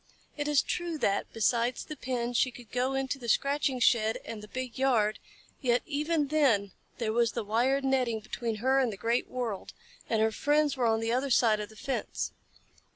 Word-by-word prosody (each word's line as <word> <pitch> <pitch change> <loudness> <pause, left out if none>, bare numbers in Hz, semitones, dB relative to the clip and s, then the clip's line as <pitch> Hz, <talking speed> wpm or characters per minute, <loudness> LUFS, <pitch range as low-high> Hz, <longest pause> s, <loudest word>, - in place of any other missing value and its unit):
It 290 -1 -2
is 295 -2 +3
true 345 -2 -2
that, 200 -8 0
besides 235 +2 +1
the 305 - -7
pen, 245 -3 -3
she 250 +2 +3
could 245 -2 -13
go 255 +2 0
into 270 +1 -2
the 235 -2 -5
scratching 275 +1 +1
shed 225 -2 +3
and 220 -2 -6
the 210 - -10
big 255 +1 -5
yard, 225 -6 +2 0.4
yet 245 -3 +2
even 300 0 0
then 245 -11 +3 0.3
there 220 -2 -1
was 235 -1 +2
the 235 - -2
wired 245 +6 +1
netting 255 -4 +1
between 225 +1 -4
her 260 +5 +2
and 255 -4 +2
the 200 - -7
great 230 +4 0
world, 235 -6 -4 0.4
and 225 - +2
her 220 0 +3
friends 295 +4 +2
were 250 -3 +1
on 225 0 +2
the 225 0 -1
other 260 +3 0
side 225 -4 +4
of 210 - -5
the 220 - -15
fence. 265 +5 -3
245 Hz, 200 wpm, -29 LUFS, 225-270 Hz, 0.4 s, side